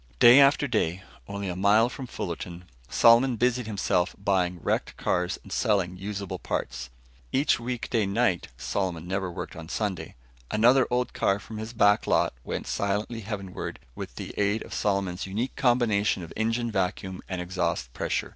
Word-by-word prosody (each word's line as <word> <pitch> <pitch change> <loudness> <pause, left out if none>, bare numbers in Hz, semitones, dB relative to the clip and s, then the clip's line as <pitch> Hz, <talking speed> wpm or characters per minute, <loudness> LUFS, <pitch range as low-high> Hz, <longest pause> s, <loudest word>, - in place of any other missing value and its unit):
Day 120 - +9
after 140 +1 +5
day, 95 -6 0 0.2
only 100 0 -4
a 90 - -3
mile 100 +5 +4
from 130 +1 -7
Fullerton, 85 -3 -6 0.2
Solomon 120 +5 +5
busied 125 0 +1
himself 95 -4 0
buying 90 -3 0
wrecked - - -1
cars 90 0 0
and - - -13
selling 95 -4 +1
usable 100 0 -5
parts. - - -3 0.4
Each 135 -2 +2
weekday 115 -3 -1
night 100 -3 +1
Solomon 90 -1 -2
never 95 -1 -2
worked - - -6
on 80 0 -9
Sunday 100 -2 -3 0.3
another 120 +4 +4
old 125 0 0
car 100 - +2
from 110 +1 -8
his 110 +1 -5
back 105 -3 +3
lot - - +2
went - - -4
silently 105 +3 -1
heavenward 100 -3 -5 0.2
with - - -7
the - - -6
aid 105 +2 +1
of - - -10
Solomon's 95 -3 -1
unique 110 +7 -3
combination 110 -7 +2
of 80 - -9
engine 115 +2 0
vacuum 95 -1 -2
and 95 -1 -3
exhaust 90 -8 -2
pressure. - - -2
100 Hz, 160 wpm, -27 LUFS, 90-115 Hz, 0.4 s, Day